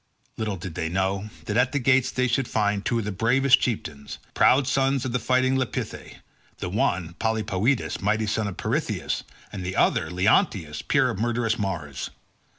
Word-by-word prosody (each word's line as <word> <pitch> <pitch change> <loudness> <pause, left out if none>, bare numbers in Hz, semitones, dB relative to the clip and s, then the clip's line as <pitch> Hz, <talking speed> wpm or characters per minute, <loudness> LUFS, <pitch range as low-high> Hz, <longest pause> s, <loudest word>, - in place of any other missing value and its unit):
Little 110 -3 -2
did 90 -1 -7
they 80 +1 -2
know 95 +3 -1 0.2
that 105 - -1
at 125 +2 +2
the - - +1
gates 130 -1 +3
they 125 0 0
should 125 +1 0
find 105 -2 0
two 120 - 0
of 115 - -2
the 105 - -2
bravest 125 +7 +4
chieftains, 80 - -4 0.2
proud 135 +2 +4
sons 135 0 +1
of 130 - -2
the 125 - 0
fighting 130 +3 +2
Lapithae—the 130 -6 -6
one, 90 -3 0
Polypoetes, 110 +3 0
mighty 110 +2 +1
son 110 0 -1
of 100 - -6
Pirithous, - - -2 0.3
and 95 -2 -5
the 95 +1 -4
other 80 - +2
Leonteus, 90 -4 +1
peer - - +2
of - - -6
murderous 115 0 0
Mars. 80 -9 -3
110 Hz, 170 wpm, -25 LUFS, 95-125 Hz, 0.3 s, bravest